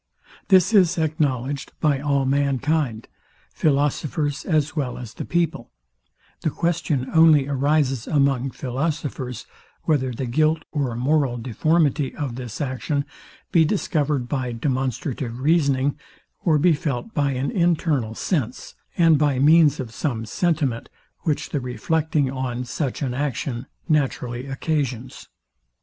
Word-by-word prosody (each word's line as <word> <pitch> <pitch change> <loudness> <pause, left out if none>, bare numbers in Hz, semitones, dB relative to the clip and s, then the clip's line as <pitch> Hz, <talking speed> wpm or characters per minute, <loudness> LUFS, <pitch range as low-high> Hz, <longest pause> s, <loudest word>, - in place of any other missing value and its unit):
This 190 +1 +5
is 185 -5 +5
acknowledged 145 -4 -1
by 150 -4 +2
all 140 -1 +1
mankind, 140 -2 0 0.5
philosophers 145 0 0
as 155 -2 +1
well 135 -5 -2
as 120 -3 -8
the - - -6
people; 170 -8 -1 0.7
the - - +1
question 160 -5 -1
only 160 -4 +6
arises 140 -2 +1
among 140 -3 +2
philosophers, 130 -1 -3 0.4
whether 130 -5 +1
the 125 +2 -4
guilt 155 +6 +1
or 140 -6 -1
moral 135 0 +1
deformity 145 +4 +1
of 140 -5 -3
this 120 -3 -7
action 140 +1 -2 0.5
be 165 - +5
discovered 150 - 0
by 130 -2 -2
demonstrative 130 0 -2
reasoning, 140 -2 +2 0.4
or 160 -4 +4
be 165 +3 +4
felt 150 - -3
by 145 -4 +1
an 130 +2 -2
internal 160 - +1
sense, 130 - -2 0.2
and 165 -4 +5
by 145 -3 +2
means 150 +1 +5
of 120 -4 -5
some 115 -4 -2
sentiment, 145 - -1 0.3
which 150 -4 -2
the 145 - -1
reflecting 150 +3 0
on 125 -2 -3
such 135 +3 -3
an 130 -3 -1
action 130 -2 -3 0.2
naturally 130 -4 0
occasions. 135 -3 -3
140 Hz, 125 wpm, -23 LUFS, 130-155 Hz, 0.7 s, only